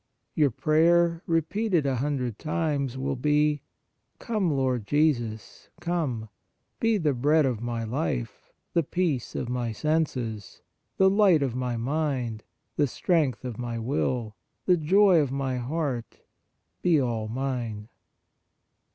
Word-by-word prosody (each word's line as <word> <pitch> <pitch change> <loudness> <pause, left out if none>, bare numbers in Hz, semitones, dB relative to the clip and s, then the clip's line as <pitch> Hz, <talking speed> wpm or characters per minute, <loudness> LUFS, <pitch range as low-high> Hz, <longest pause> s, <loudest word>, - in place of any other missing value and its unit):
Your 150 -2 +3
prayer, 170 +5 +3
repeated 170 +1 +1
a 135 -2 0
hundred 125 -4 -2
times, 145 -5 -1
will 135 +1 -2
be: 150 +2 +2 0.3
" - - -49
Come, 215 -7 -1
Lord 130 -6 0
Jesus, 120 -8 0
come; 150 -11 -2 0.5
be 225 -1 +2
the 155 -6 +1
Bread 145 +5 +3
of 120 -5 -1
my 120 -1 -3
life, 110 - -3 0.2
the 170 - +3
Peace 160 -5 -2
of - - -2
my 120 -1 -2
senses, 125 -6 -2 0.3
the 190 - +5
Light 190 -6 +4
of 130 -4 -1
my 125 -2 -2
mind, 125 -4 -2 0.3
the 145 - +3
Strength 150 -2 0
of 120 -3 -5
my 120 -1 -3
will, 115 -2 -1 0.3
the 180 - +5
Joy 180 +3 +5
of 140 -4 0
my 135 -2 -1
heart, 130 -2 -3 0.6
be 170 -4 +4
all 115 -4 -1
mine." 120 -3 -3
140 Hz, 135 wpm, -27 LUFS, 120-160 Hz, 0.6 s, the